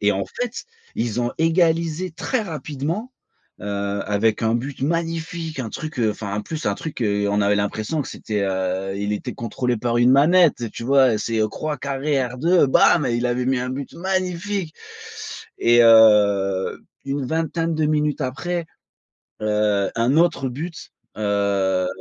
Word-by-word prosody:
et 105 0 +3
en 95 0 -2
fait, 240 - -4 0.4
ils 120 0 -1
ont 120 - 0
égalisé 165 +1 +1
très 245 +9 -2
rapidement, 160 - -4 0.5
heu, 100 0 -3
avec 105 +1 +1
un 110 +1 +2
but 135 +4 -4
magnifique, 165 -1 -2
un 115 - -4
truc, 155 -4 -6
heu 110 -2 +2
enfin, 100 -1 -5
en 105 - -1
plus, 160 +5 -6
un 100 - +1
truc, 150 -2 -6
heu, 100 -1 +1
on 105 0 +1
avait 100 +1 +3
l'impression 105 +8 -2
que - - -9
c'était, 105 -2 -4
heu 95 0 -2
il 100 +1 -2
était 120 +4 -4
contrôlé 120 +1 -2
par 120 +1 0
une 120 +1 +5
manette, 150 - +4
tu 115 - -7
vois? 130 -4 +4
C'est, 115 +1 -2
heu, 110 - +2
croix, 150 +5 -4
carré, 140 +1 -1 0.2
R2, 170 -2 +4
bam 145 +3 +4
et 120 - 0
il 120 +1 0
avait 125 +1 -1
mis 130 -1 +2
un 125 +1 -3
but 135 +1 -5
magnifique! 185 -1 -2 0.8
Et 120 0 +5
heu, 105 -4 +5 0.3
une 140 0 -2
vingtaine 165 +1 -1
de 155 -1 +1
minutes 150 -1 0
après, 165 +6 -3 0.8
heu, 105 -2 +1
un 120 +5 +2
autre 165 -5 +2
but, 160 +7 -7 0.3
heu, 100 -3 +1
125 Hz, 165 wpm, -22 LUFS, 105-160 Hz, 0.8 s, une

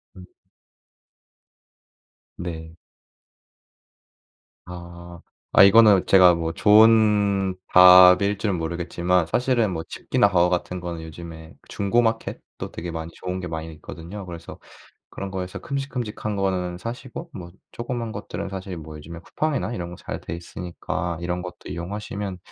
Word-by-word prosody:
음. 90 -1 -12 2.1
네. 80 -2 -7 1.9
아. 85 -1 -10 0.3
아 - - +8
이거는 100 -1 +6
제가 90 -2 +7
뭐 80 0 -3
좋은 105 -2 +4 0.2
답일 90 +2 +8
줄은 105 -3 -1
모르겠지만 85 +1 -1
사실은 120 -2 +1
뭐 80 - -4
집기나 - - 0
가구 90 -1 +3
같은 90 0 -2
거는 85 -2 -6
요즘에 80 0 -10
중고 100 +4 +1
마켓도 115 -1 -4
되게 85 - -6
많이 80 0 -6
좋은 90 0 -5
게 90 - -5
많이 80 0 -5
있거든요. 85 +6 -9
그래서 85 -2 -10 0.5
그런 100 0 -6
거에서 95 -1 -5
큼직큼직한 125 -6 -4
거는 90 -2 -1
사시고 125 - -7
뭐 90 -8 -9 0.2
조그만 120 -1 -5
것들은 100 -2 -6
사실 95 -1 -6
뭐 80 -1 -9
요즘에 85 +3 -10
쿠팡이나 145 - -2
이런 85 -5 -5
거 - - -12
잘 - - -7
돼 - - -6
있으니까 85 0 -5
이런 90 +1 -3
것도 90 0 -10
이용하시면 95 +2 -5
90 Hz, 290 characters per minute, -23 LUFS, 85-105 Hz, 2.1 s, 아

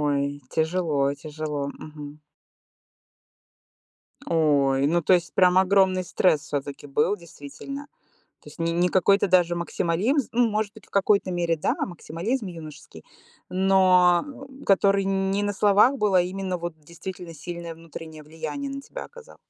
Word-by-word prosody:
Ой, 145 -1 +1 0.3
тяжело, 160 -3 0 0.2
тяжело. 150 -2 -4 0.2
Мгм. 150 -1 -9 2.2
Ой, 140 -4 +2
ну, 170 +3 +1
то 175 - +3
есть, 175 -2 +2
прям 180 0 +5
огромный 190 -1 +3
стресс 175 -3 +2
всё-таки 145 -2 -5
был 150 +8 +1
действительно. 170 - -9 0.5
То - - -15
есть - - -15
не 165 0 0
не 175 +1 +2
какой-то 195 +2 +3
даже 175 -1 +3
максимализм- 185 - 0
ну, 240 0 +3
может 210 -1 -1
быть, 220 - -15
в - - -29
какой-то 200 -1 +2
мере, 170 -2 0
да, 150 - 0
максимализм 190 +7 -4
юношеский,- 155 - -10 0.4
но 185 -1 +4 0.4
который, 195 0 +3
м, 195 0 0
не 200 +1 0
на 205 - 0
словах 205 +6 +4
был, 210 -5 +1
а 180 - +6
именно 185 0 -3
вот 170 -1 -5
действительно 170 +2 -9
сильное 170 +2 -7
внутреннее 160 -1 -10
влияние 165 - -6
на 275 0 -5
тебя - - -8
оказал. 485 0 -14
180 Hz, 145 wpm, -25 LUFS, 160-195 Hz, 2.2 s, а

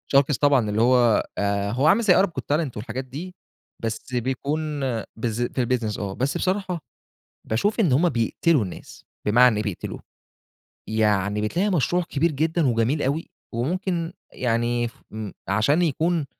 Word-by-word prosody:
sharks 140 -1 +4
طبعًا، 140 -7 +4
اللي 105 +2 +1
هو 120 -2 +4
آآ، 100 0 0
هو 135 +6 +2
عامل 205 +8 +5
زي 190 -4 +6
Arab 190 - +5
Got 170 - -5
Talent 150 -4 0
والحاجات 130 +4 -5
دي، 170 +8 -8 0.5
بس 115 +3 -4
بيكون 130 +5 -1 0.6
بالذ 115 +1 -1
في 125 -2 0
الbusiness 115 -4 -1
آه، 100 -2 -3
بس 130 +6 -1
بصراحة 185 -2 -1 0.7
باشوف 205 - 0
إن 175 -11 +3
هُم 165 +7 +4
بيقتلوا 125 +3 +1
الناس، 90 - -10 0.2
بمعنى 115 +1 +5
إيه 105 - -1
بيقتلوا، 100 -4 -5 0.9
يعني 105 -2 +1
بتلاقي 175 - 0
مشروع 175 0 +1
كبير 165 0 0
جدًا 160 +1 +1
وجميل 120 +5 +1
أوي، 145 +5 -1 0.2
وممكن 170 +7 -2 0.2
يعني 120 0 0
ف - - -13 0.2
م 110 -2 -5 0.2
عشان 110 - +2
يكون 165 0 +1
130 Hz, 155 wpm, -24 LUFS, 110-165 Hz, 0.9 s, زي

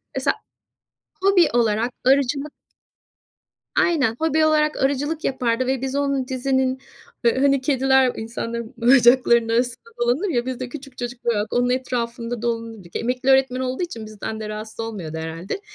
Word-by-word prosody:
Mesela - - +1 0.9
hobi 380 -4 +5
olarak 230 0 +2
arıcılık 275 +2 +2 1.3
Aynen, 290 -11 +2
hobi 315 0 +2
olarak 305 -1 +2
arıcılık 290 +3 0
yapardı 250 -1 0
ve 265 -1 0
biz 270 +1 -3
onun 275 -2 0
dizinin, 260 0 0 0.5
ha 235 - +7
hani 275 0 +3
kediler 265 -1 +3
insanların 230 +1 -5
bacaklarının 240 -1 +5
arasında 250 - -1
dolanır 265 +12 +1
ya, 240 -5 0
biz 260 -1 -4
de 255 -1 -4
küçük 275 -2 -10
çocuklar 240 -1 -2
olarak 210 0 -2
onun 245 0 +2
etrafında 240 -2 -2
dolanırdık. 230 -6 -4
Emekli 250 +3 -1
öğretmen 265 -1 +4
olduğu 260 +6 -2
için 230 -10 -6
bizden 215 +1 -6
de 215 -1 -5
rahatsız 215 +1 -7
olmuyordu 190 -9 -5
herhâlde. 165 - -5
250 Hz, 145 wpm, -22 LUFS, 230-270 Hz, 1.3 s, ha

